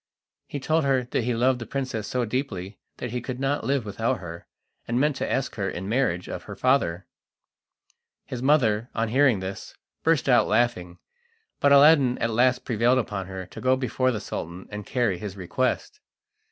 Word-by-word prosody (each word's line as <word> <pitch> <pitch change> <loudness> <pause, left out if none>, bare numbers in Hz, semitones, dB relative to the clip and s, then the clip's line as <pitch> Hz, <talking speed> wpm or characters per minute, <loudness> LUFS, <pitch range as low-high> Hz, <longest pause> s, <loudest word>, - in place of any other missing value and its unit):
He 145 - -5
told 160 +4 +1
her 130 -3 +1
he 120 0 0
loved 125 +2 +2
the 120 - -7
princess 130 -5 -3
so 125 -1 -1
deeply 105 -6 -4 0.2
that 125 - -5
he 125 0 -3
could 125 +1 -5
not 135 +2 0
live 135 -4 0
without 115 +5 -1
her, 85 -3 -9 0.4
and 120 +1 0
meant 150 +1 +2
to - - -2
ask 135 - -1
her 100 -2 -1
in 95 +3 -5
marriage 105 -7 0
of - - -6
her - - -8
father. 95 -9 +1 1.2
His 125 - -6
mother, 125 -5 +2
on 115 0 0
hearing 130 -4 +3
this, 95 +1 -7 0.3
burst 160 -6 +2
out 125 -2 +5
laughing, 105 -6 0 0.6
but 140 - +4
Aladdin 140 -3 +6
at 115 - -1
last 125 +3 +2
prevailed 120 +2 +2
upon 100 -6 -2
her 95 -1 -6
to 90 - -11
go 130 +1 +3
before 130 0 0
the 115 -4 -1
Sultan 90 -2 -6
and 105 0 -7
carry 120 -9 0
his 100 -1 -6
request. 130 - -2
120 Hz, 180 wpm, -25 LUFS, 105-130 Hz, 1.2 s, Aladdin